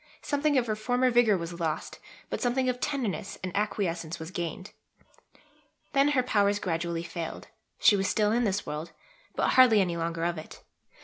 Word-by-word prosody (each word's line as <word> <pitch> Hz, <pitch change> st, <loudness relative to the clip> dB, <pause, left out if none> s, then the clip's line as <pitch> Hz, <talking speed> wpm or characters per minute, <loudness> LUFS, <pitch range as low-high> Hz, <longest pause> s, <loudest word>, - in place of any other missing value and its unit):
Something 290 Hz, 0 st, +1 dB
of 250 Hz, -, +2 dB
her 215 Hz, -2 st, -1 dB
former 250 Hz, +4 st, +1 dB
vigour 235 Hz, -4 st, +4 dB
was 170 Hz, 0 st, -6 dB
lost, 160 Hz, -2 st, -3 dB, 0.3 s
but -, -, -3 dB
something 255 Hz, +1 st, +1 dB
of 250 Hz, -1 st, -1 dB
tenderness 245 Hz, -9 st, -2 dB
and 185 Hz, -1 st, -4 dB
acquiescence 180 Hz, -5 st, -1 dB
was 160 Hz, +1 st, -8 dB
gained. 175 Hz, +2 st, -5 dB, 1.2 s
Then 275 Hz, 0 st, +4 dB
her 255 Hz, -, +4 dB
powers 205 Hz, -4 st, +2 dB
gradually 170 Hz, -2 st, -2 dB
failed; 170 Hz, -1 st, -6 dB, 0.3 s
she 205 Hz, -, +5 dB
was 195 Hz, -1 st, 0 dB
still 210 Hz, -1 st, +2 dB
in 240 Hz, +2 st, +2 dB
this 200 Hz, -2 st, 0 dB
world, 150 Hz, +2 st, -5 dB, 0.4 s
but -, -, +1 dB
hardly 250 Hz, -4 st, +6 dB
any 175 Hz, -3 st, +1 dB
longer 165 Hz, 0 st, -2 dB
of 170 Hz, -1 st, -1 dB
it. 155 Hz, -, -12 dB
200 Hz, 175 wpm, -28 LUFS, 170-245 Hz, 1.2 s, hardly